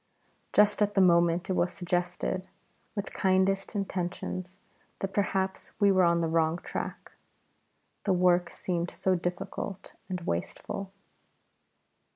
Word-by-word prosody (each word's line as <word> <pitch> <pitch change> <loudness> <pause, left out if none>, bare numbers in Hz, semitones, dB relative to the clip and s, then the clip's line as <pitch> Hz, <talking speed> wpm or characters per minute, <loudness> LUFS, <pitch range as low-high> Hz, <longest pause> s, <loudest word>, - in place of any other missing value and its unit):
Just 210 0 +4
at 205 0 +2
that 195 - +5
moment 170 -1 +4
it 190 - 0
was 180 -1 +1
suggested, 180 +1 -2 0.5
with 200 -1 -4
kindest 190 +2 +2
intentions, 185 -1 -3 0.4
that 195 0 -4
perhaps 190 -2 -1
we 200 -2 +5
were 185 -1 +4
on 170 -1 +4
the 165 - +1
wrong 160 0 +2
track, - - -5 0.9
the 195 - +3
work 180 -1 +3
seemed 175 -1 -2
so 190 - 0
difficult 180 +2 -4 0.2
and 180 -1 -3
wasteful. 180 - -4
185 Hz, 125 wpm, -29 LUFS, 175-195 Hz, 0.9 s, that